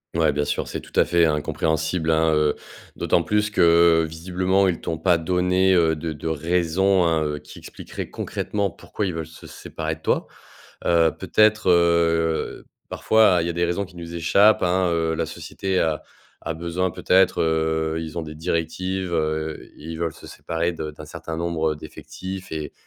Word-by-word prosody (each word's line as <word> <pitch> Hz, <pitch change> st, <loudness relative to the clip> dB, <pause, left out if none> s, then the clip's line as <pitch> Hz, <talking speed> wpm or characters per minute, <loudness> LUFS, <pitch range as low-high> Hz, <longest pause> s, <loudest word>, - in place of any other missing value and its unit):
Ouais, -, -, +3 dB
bien 75 Hz, 0 st, -1 dB
sûr, -, -, -2 dB
c'est -, -, -4 dB
tout -, -, -16 dB
à -, -, +5 dB
fait, 85 Hz, -1 st, +3 dB
hein, 75 Hz, -2 st, +1 dB
compréhensible, 80 Hz, +2 st, -1 dB
hein, 80 Hz, 0 st, +3 dB
heu, 75 Hz, -1 st, +2 dB, 0.4 s
d'autant 85 Hz, -, +1 dB
plus 105 Hz, +4 st, +1 dB
que 85 Hz, -3 st, +4 dB
visiblement, 90 Hz, +4 st, 0 dB
ils 85 Hz, -3 st, -1 dB
t'ont 80 Hz, -2 st, -4 dB
pas 85 Hz, 0 st, +3 dB
donné, 90 Hz, +3 st, +2 dB
heu, 80 Hz, -3 st, +3 dB
de 80 Hz, +1 st, -4 dB
de 75 Hz, +1 st, -7 dB
raisons, 90 Hz, +4 st, +1 dB
hein, 80 Hz, -2 st, +2 dB
heu, 75 Hz, -1 st, -3 dB
qui 75 Hz, 0 st, -14 dB
expliqueraient -, -, -8 dB
concrètement 100 Hz, -1 st, -2 dB
pourquoi 90 Hz, +4 st, -5 dB
ils 90 Hz, -, -3 dB
veulent 80 Hz, -1 st, -4 dB
se 80 Hz, +1 st, -14 dB
séparer 80 Hz, 0 st, -5 dB
de 80 Hz, -, -21 dB
toi. -, -, 0 dB, 0.6 s
Heu, 85 Hz, -1 st, +4 dB
peut-être, 110 Hz, -1 st, +2 dB
heu, 85 Hz, -2 st, +2 dB, 0.2 s
parfois, 110 Hz, -5 st, +4 dB
il 85 Hz, -, -2 dB
y -, -, -2 dB
a -, -, -2 dB
des 85 Hz, +1 st, +1 dB
raisons 85 Hz, +4 st, -1 dB
qui 90 Hz, -, -18 dB
nous 85 Hz, 0 st, -8 dB
échappent, 100 Hz, +5 st, +4 dB
hein, 90 Hz, +1 st, +2 dB
heu, 80 Hz, -1 st, 0 dB
la -, -, -1 dB
société 95 Hz, -1 st, -3 dB
a 80 Hz, -2 st, 0 dB, 0.4 s
a 80 Hz, -, -2 dB
besoin 85 Hz, +3 st, -2 dB
peut-être 95 Hz, +1 st, +3 dB
heu, 80 Hz, 0 st, 0 dB
ils 80 Hz, 0 st, -7 dB
ont -, -, -3 dB
des 75 Hz, -1 st, -8 dB
directives, 85 Hz, +3 st, -2 dB
heu, 80 Hz, -1 st, -2 dB
i 80 Hz, +2 st, -8 dB
ils 80 Hz, -, -7 dB
veulent 85 Hz, -2 st, -2 dB
se -, -, -13 dB
séparer 85 Hz, +1 st, -3 dB
de 80 Hz, -2 st, -5 dB
d'un 75 Hz, +1 st, -11 dB
certain 80 Hz, +1 st, -7 dB
nombre, 85 Hz, -2 st, 0 dB
heu, -, -, -10 dB
d'effectifs 95 Hz, +5 st, -8 dB
et 80 Hz, -1 st, -4 dB
85 Hz, 190 wpm, -23 LUFS, 80-90 Hz, 0.6 s, à